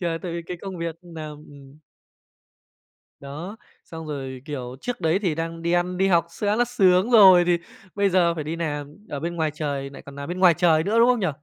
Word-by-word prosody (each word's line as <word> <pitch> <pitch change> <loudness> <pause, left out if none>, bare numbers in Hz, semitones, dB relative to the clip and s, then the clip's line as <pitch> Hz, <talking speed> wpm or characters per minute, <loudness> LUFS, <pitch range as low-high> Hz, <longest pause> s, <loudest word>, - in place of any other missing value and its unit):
Thì 175 - -2
là 165 -1 -1
tại 175 -3 -4
vì 170 0 -4
cái 180 - -5
công 195 -2 -6
việc 165 -1 -3
nà 165 -3 -8
ừm. 145 -1 -14 1.4
Đó, 155 +10 -8 0.3
xong 160 -1 -9
rồi, 135 -3 -6
kiểu, 130 -5 -6
trước 245 -5 -4
đấy 165 +3 +2
thì 180 -7 -1
đang 165 0 -4
đi 170 +1 -1
ăn, 175 +1 0
đi 190 +1 +2
học 170 -3 +3
sẽ 205 +4 -1
là 240 - +2
sướng 195 -2 +3
rồi 190 -6 +8
thì 175 -1 +3 0.4
bây 200 -1 +2
giờ 175 -2 +3
phải 155 - -4
đi 155 +3 -4
làm 145 -3 -4
ở 145 - -4
bên 170 +3 -4
ngoài 160 -2 0
trời, 140 -3 -3
lại 135 - -11
còn 140 - -12
nà 140 +1 -7
bên 180 +1 -5
ngoài 180 -3 +6
trời 165 -3 +3
nữa, 220 +6 +1
đúng 235 - +6
không 245 - +3
nhỉ? 185 - 0
170 Hz, 235 wpm, -24 LUFS, 150-185 Hz, 1.4 s, rồi